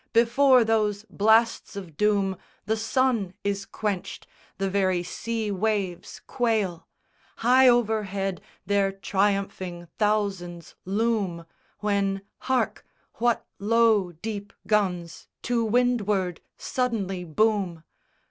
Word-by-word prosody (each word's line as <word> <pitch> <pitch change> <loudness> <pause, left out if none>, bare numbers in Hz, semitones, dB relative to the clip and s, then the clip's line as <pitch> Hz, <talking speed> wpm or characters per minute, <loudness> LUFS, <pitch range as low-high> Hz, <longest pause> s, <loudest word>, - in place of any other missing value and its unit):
Before 240 +2 +5
those 215 -2 +1
blasts 220 +2 +3
of 180 -6 -8
doom 200 -1 +1 0.3
The 220 +2 +1
sun 225 -4 0
is 200 -1 -2
quenched, 205 -4 -4 0.3
the 195 - -1
very 190 -2 +1
sea 220 +3 -3
waves 200 -3 -2
quail: 215 -8 -1 0.5
High 255 +2 +5
overhead 205 -6 0 0.2
their 200 0 +2
triumphing 195 -3 -1
thousands 195 -5 -1
loom, 200 -4 -1 0.4
When 200 -2 0 0.2
hark! 260 -1 -1 0.4
what 240 0 +1
low 215 -3 +3
deep 205 +4 -6
guns 180 -6 -1 0.2
to 235 -1 +1
windward 210 -6 +1 0.2
suddenly 205 -8 -2
boom? 185 -1 0
205 Hz, 100 wpm, -26 LUFS, 190-225 Hz, 0.5 s, Before